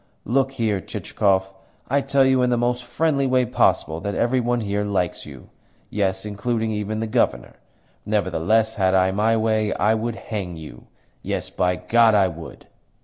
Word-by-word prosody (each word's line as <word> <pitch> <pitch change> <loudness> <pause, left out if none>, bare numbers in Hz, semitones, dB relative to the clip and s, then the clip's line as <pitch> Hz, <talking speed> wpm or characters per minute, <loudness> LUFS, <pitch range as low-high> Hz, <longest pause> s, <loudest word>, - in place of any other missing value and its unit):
"Look 135 +3 +1
here, 110 -6 -1
Chichikov. 95 -1 -1 0.3
I 140 +2 +1
tell 135 0 +2
you 130 -1 +3
in 125 - +2
the 120 - +1
most 120 +1 0
friendly 140 +2 0
way 130 -1 +2
possible 80 -7 +1
that 100 +1 -3
every 125 +2 +1
one 120 0 0
here 100 -1 -1
likes 95 -4 -2
you - - -12 0.4
yes, 95 -1 -1
including 110 +2 -2
even 105 +1 -3
the - - -1
Governor. 65 - -1 0.5
Nevertheless, 105 +2 +1
had 95 0 +3
I 95 0 +3
my 110 +3 +2
way, 110 -1 +1
I 105 +2 +2
would 110 +1 -2
hang 95 -7 -5
you! 75 -6 -11 0.3
Yes, - - -4
by 90 0 0
God 115 +2 +3
I 95 -2 +4
would!" 80 -1 -10
110 Hz, 170 wpm, -22 LUFS, 95-120 Hz, 0.5 s, I